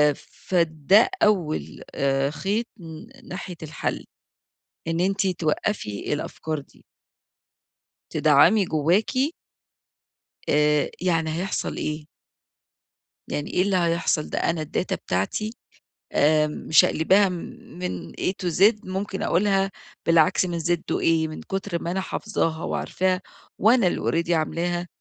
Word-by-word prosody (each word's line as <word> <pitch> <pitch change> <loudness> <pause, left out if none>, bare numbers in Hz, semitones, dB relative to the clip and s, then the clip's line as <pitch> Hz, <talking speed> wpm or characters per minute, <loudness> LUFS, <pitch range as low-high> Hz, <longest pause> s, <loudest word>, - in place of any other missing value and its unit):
فده 170 - +2
أول 155 - 0
آآ، 135 0 +1
خيط 200 +9 -1
ن 170 +10 -12
ناحية 180 -1 -7
الحل، 155 0 -4 0.8
إن 165 +1 0
أنتِ 195 +2 +1
توقفي 160 - -2
الأفكار 155 +1 -3
دي. 140 - -20 1.3
تدعمي 155 +8 +5
جواكِ. 195 - +1 1.2
آآ، 150 0 +3
يعني 165 -3 +1
هيحصل 190 +4 -2
إيه؟ 150 0 -4 1.2
يعني 145 - -3
إيه 180 - +2
اللي 195 0 +1
هيحصل، 170 -3 +1
ده - - -1
أنا 165 -2 0
الداتا 160 +4 -2
بتاعتي 155 - -2 0.6
آآ، 150 +1 +4
مشقلباها 160 +6 +3
من 180 0 -6
A - - -7 0.2
to - - 0
Z 200 +7 +5
ممكن 190 +1 -3
أقولها 195 +1 +2 0.3
بالعكس 165 +2 +4
من 175 -2 -3
Z 170 +2 +1 0.2
to - - +2
A - - +2 0.2
من 155 - -7
كتر 190 -3 -3
ما 170 - -3
أنا 190 +1 -1
حافظاها 165 -5 -2
وعارفاها 185 0 -1 0.4
وأنا 230 -1 +5
اللي 170 -1 0
already 175 - -2
عاملاها، 175 +2 -1
175 Hz, 120 wpm, -24 LUFS, 155-195 Hz, 1.3 s, تدعمي